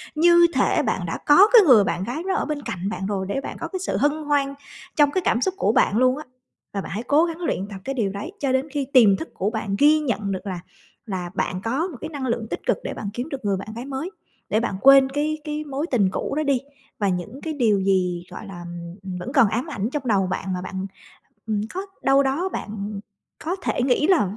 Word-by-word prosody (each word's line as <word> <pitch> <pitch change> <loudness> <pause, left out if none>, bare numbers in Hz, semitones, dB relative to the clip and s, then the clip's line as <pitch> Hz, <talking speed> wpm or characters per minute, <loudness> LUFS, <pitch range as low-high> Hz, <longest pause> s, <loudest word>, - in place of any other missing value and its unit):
như 345 +2 +6
thể - - +2
bạn - - -1
đã - - -3
có 365 +8 +8
cái 465 - +10
người 235 -7 +8
bạn 185 -1 -1
gái 260 - -4
đó 380 - +1
ở - - 0
bên 300 -1 -3
cạnh 185 -5 -4
bạn 195 -2 -4
rồi 195 -1 -2
để 270 - -1
bạn - - -7
có - - -4
cái 375 - -5
sự 375 - -2
hân 290 +1 +3
hoan 285 -2 +1 0.4
trong 290 -1 +4
cái 375 - 0
cảm 235 - +2
xúc 375 - +1
của 210 - +2
bạn 215 - +3
luôn 255 +2 +3
á. 305 - -6 0.5
Và 200 - -2
bạn - - -8
hãy 210 +5 -3
cố 290 +6 +4
gắng 335 -1 -5
luyện 200 - -2
tập 200 - -7
cái 270 +4 -3
điều 210 -6 0
đấy 205 - -6
cho 275 - 0
đến 260 +2 +1
khi 285 -2 -1
tiềm 215 -7 +7
thức 325 - -6
của 195 +3 -1
bạn 220 -3 -3
ghi 305 +2 +6
nhận 220 -8 -2
được 190 +2 -4
là 185 -2 -3 0.5
là 180 -4 -4
bạn 185 0 -2
có 270 - -1
một 355 - -9
cái 315 - -5
năng 285 -4 -5
lượng 230 -2 -2
tích - - -5
cực - - +2
để - - -4
bạn 200 - -5
kiếm 245 +6 -4
được 270 -6 -6
người 200 -1 +1
bạn 195 - -7
gái 240 +3 -6
mới, 280 +7 -4 0.4
để 215 - +2
bạn 230 -4 -2
quên 270 0 +7
cái 300 +3 -1
cái 300 0 -3
mối 285 +2 -3
tình 205 -7 +3
cũ - - -3
đó 310 - +1
đi. 280 -3 +2 0.4
Và 200 - +1
những 190 +9 -4
cái 320 - -3
điều 220 -8 +2
gì, 180 -2 +1
gọi 215 - -8
là, 190 -3 -8
ừm, 170 0 -8
ừm, 185 -2 -5
vẫn 250 +9 -6
còn 265 -7 +6
ám 240 +5 -1
ảnh 215 -4 -2
trong 280 -3 -3
đầu 195 -4 +2
bạn 190 +1 -3
mà 180 - -3
bạn, 190 +1 -5 0.6
ừm, 215 -2 0
có 375 - -2 0.2
đâu 270 +1 +4
đó 305 +8 0
bạn, - - -5
ừm, 205 -1 -5 0.4
có 345 +4 -1
thể - - 0
nghĩ 260 +3 +2
là 215 - +2
250 Hz, 260 wpm, -23 LUFS, 200-295 Hz, 0.6 s, cái